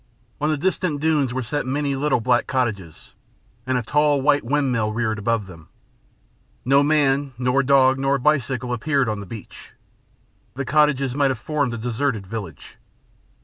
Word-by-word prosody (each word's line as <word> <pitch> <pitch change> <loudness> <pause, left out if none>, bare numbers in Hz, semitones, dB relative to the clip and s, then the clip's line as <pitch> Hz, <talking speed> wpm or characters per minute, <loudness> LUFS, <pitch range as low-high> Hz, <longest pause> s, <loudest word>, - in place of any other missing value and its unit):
On 150 - +1
the 155 - 0
distant 175 -1 -1
dunes 150 -4 +1
were 130 +1 -3
set 145 +3 -3
many 140 +1 -1
little 135 -1 +1
black 120 +1 +1
cottages, 105 - -3 0.5
and 130 -1 +1
a 125 - -2
tall 150 +3 +2
white 145 +1 +2
windmill 125 -4 0
reared 110 -1 -2
above 110 0 -1
them. 85 -4 -14 1.0
No 135 +2 +4
man, 145 -2 +1
nor 125 +2 +1
dog, 135 -1 +4
nor 135 +1 +1
bicycle 130 -3 0
appeared 135 +2 0
on 105 -1 -2
the 100 - -8
beach. 110 -5 -11 0.8
The 135 +1 -3
cottages 140 -3 +2
might 140 0 +2
have 130 - -2
formed 140 -1 -2
a - - -5
deserted 120 -1 -2
village. 100 -3 -8
130 Hz, 160 wpm, -22 LUFS, 115-145 Hz, 1.0 s, No